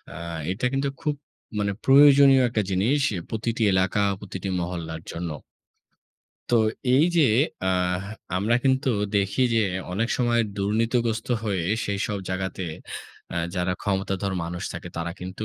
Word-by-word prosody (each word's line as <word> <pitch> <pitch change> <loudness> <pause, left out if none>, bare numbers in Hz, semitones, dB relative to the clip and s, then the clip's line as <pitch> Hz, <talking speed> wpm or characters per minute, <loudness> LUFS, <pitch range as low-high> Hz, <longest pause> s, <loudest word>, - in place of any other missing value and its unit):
আ - - -7 0.3
এটা 100 +6 -2
কিন্তু 135 +1 0
খুব 150 -2 0 0.4
মানে 100 -1 0
প্রয়োজনীয় 140 -1 +7
একটা 110 -2 0
জিনিস 105 +10 +2 0.3
প্রতিটি 115 +1 -2
এলাকা, 95 +2 +2 0.2
প্রতিটি 95 -1 -6
মহল্লার 85 -2 -5
জন্য। 85 0 -4 1.2
তো 120 - +3 0.4
এই 145 +4 +5
যে 165 - +6 0.4
অ্যাহ 90 0 +1 0.3
আমরা 105 +5 +2
কিন্তু 130 +1 +2 0.3
দেখি 100 +3 0
যে 115 - +4 0.3
অনেক 115 +5 0
সময় 120 -1 +2 0.2
দুর্নীতিগ্রস্ত 110 +3 0 0.2
হয়ে 95 -5 -1 0.2
সেইসব 100 0 -2
জায়গাতে 95 0 -3 0.7
অ্যা - - -2 0.2
যারা 90 0 0
ক্ষমতাধর 95 -1 -1
মানুষ 85 +2 -5
থাকে 85 +2 -7
তারা 85 0 -3
কিন্তু 95 +4 -5
100 Hz, 130 wpm, -25 LUFS, 95-120 Hz, 1.2 s, প্রয়োজনীয়